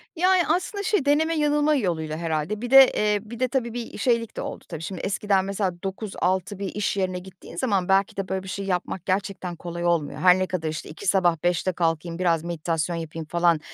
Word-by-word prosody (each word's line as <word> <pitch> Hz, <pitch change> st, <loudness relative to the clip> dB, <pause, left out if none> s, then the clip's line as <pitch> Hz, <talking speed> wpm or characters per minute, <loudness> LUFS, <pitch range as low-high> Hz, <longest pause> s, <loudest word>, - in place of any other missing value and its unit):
Yani, 365 Hz, +1 st, +4 dB
aslında 400 Hz, +3 st, 0 dB
şey, 405 Hz, -8 st, +1 dB
deneme 315 Hz, +3 st, +3 dB
yanılma 295 Hz, 0 st, +3 dB
yoluyla 160 Hz, -, -1 dB
herhâlde. 165 Hz, +6 st, -2 dB
Bir 245 Hz, -, -4 dB
de, 270 Hz, -1 st, +9 dB
eee, 210 Hz, -1 st, +2 dB
bir 230 Hz, +2 st, -9 dB
de 255 Hz, -, +2 dB
tabii 235 Hz, -2 st, -2 dB
bir 240 Hz, -1 st, -6 dB
şeylik 230 Hz, 0 st, 0 dB
de -, -, -2 dB
oldu -, -, -6 dB
tabii. 165 Hz, -2 st, -6 dB
Şimdi, 185 Hz, +1 st, -5 dB
eskiden, 195 Hz, -1 st, +1 dB
mesela, 195 Hz, -1 st, -1 dB
9.00-18.00 190 Hz, -1 st, -2 dB
bir 200 Hz, -, -2 dB
iş 205 Hz, -1 st, -1 dB
yerine 185 Hz, -1 st, -1 dB
gittiğin 185 Hz, 0 st, -13 dB
zaman, 200 Hz, -8 st, 0 dB
belki 195 Hz, +1 st, +2 dB
de 195 Hz, -1 st, -2 dB
böyle 190 Hz, 0 st, -2 dB
bir -, -, -10 dB
şey 195 Hz, +1 st, -4 dB
yapmak 185 Hz, -1 st, -2 dB
gerçekten 190 Hz, -2 st, -2 dB
kolay 170 Hz, 0 st, -5 dB
olmuyor. 170 Hz, -4 st, 0 dB
Her 185 Hz, 0 st, +6 dB
ne 185 Hz, -, 0 dB
kadar, 165 Hz, -4 st, -2 dB
işte, 155 Hz, -1 st, -6 dB
2 180 Hz, +6 st, -8 dB
sabah, 175 Hz, -4 st, +2 dB
5'te 175 Hz, +1 st, +1 dB
kalkayım, 165 Hz, 0 st, -1 dB
biraz 170 Hz, -3 st, +2 dB
meditasyon 170 Hz, 0 st, -2 dB
yapayım 165 Hz, -1 st, -5 dB
falan, 170 Hz, 0 st, +2 dB
190 Hz, 210 wpm, -25 LUFS, 170-220 Hz, -, de